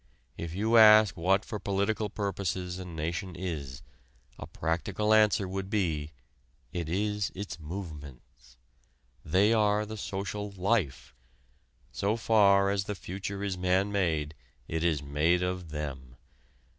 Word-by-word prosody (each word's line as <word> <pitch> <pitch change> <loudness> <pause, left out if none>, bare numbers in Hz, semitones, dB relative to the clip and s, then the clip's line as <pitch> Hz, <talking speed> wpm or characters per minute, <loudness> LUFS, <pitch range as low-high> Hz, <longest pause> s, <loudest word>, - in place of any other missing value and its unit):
If 85 0 -6
you 110 +4 +3
ask 110 -4 +8
what 95 +4 +2
for 105 - -5
political 100 +2 -1
purposes 95 -3 -3
a 95 - -6
nation 85 +2 -4
is, 75 -6 -5 0.6
a - - -7
practical 90 +7 -1
answer 105 -2 +4
would 95 +1 -4
be: 80 -8 -1 0.6
it 85 -3 -3
is 105 +2 -1
its 95 -2 -6
"movements." 75 -7 -9 0.7
They 95 +8 +3
are 105 -1 +2
the 110 +1 -7
social 105 +1 -4
life. 95 - -1 0.8
So 100 +2 0
far 100 -3 +4
as 100 -1 -1
the 105 - -4
future 100 +2 -5
is 95 -2 -3
man 95 +2 +1
made 80 -7 0 0.3
it 80 0 -2
is 80 -4 +1
made 80 +5 +1
of 90 -2 -3
them. 70 -5 -6
95 Hz, 130 wpm, -29 LUFS, 80-105 Hz, 0.8 s, ask